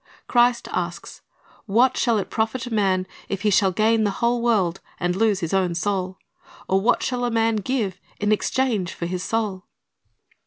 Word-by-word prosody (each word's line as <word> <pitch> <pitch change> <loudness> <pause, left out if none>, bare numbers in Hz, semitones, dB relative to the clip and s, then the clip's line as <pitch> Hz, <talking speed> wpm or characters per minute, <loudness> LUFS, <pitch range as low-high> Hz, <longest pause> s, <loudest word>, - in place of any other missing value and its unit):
Christ 240 -1 +3
asks, - - -4 0.5
"What 240 +5 +3
shall 235 -3 +2
it 200 - -3
profit 225 +2 -1
a 245 - -6
man, 190 -3 +1 0.2
if 200 0 -3
he 210 - +3
shall 195 0 +4
gain 220 +3 +2
the 205 - +2
whole 235 0 +1
world, 200 -7 +1 0.2
and 180 0 0
lose 205 -1 +2
his 165 0 -3
own 185 -3 +1
soul? 185 0 -2 0.5
or 190 +1 +2
what 220 - +2
shall 250 -1 -1
a 245 - +1
man 225 -1 +1
give 210 -3 -2 0.2
in 210 0 +1
exchange 215 -4 0
for 170 - -4
his 180 +1 -3
soul?"' 210 -4 -2
210 Hz, 180 wpm, -23 LUFS, 190-235 Hz, 0.5 s, shall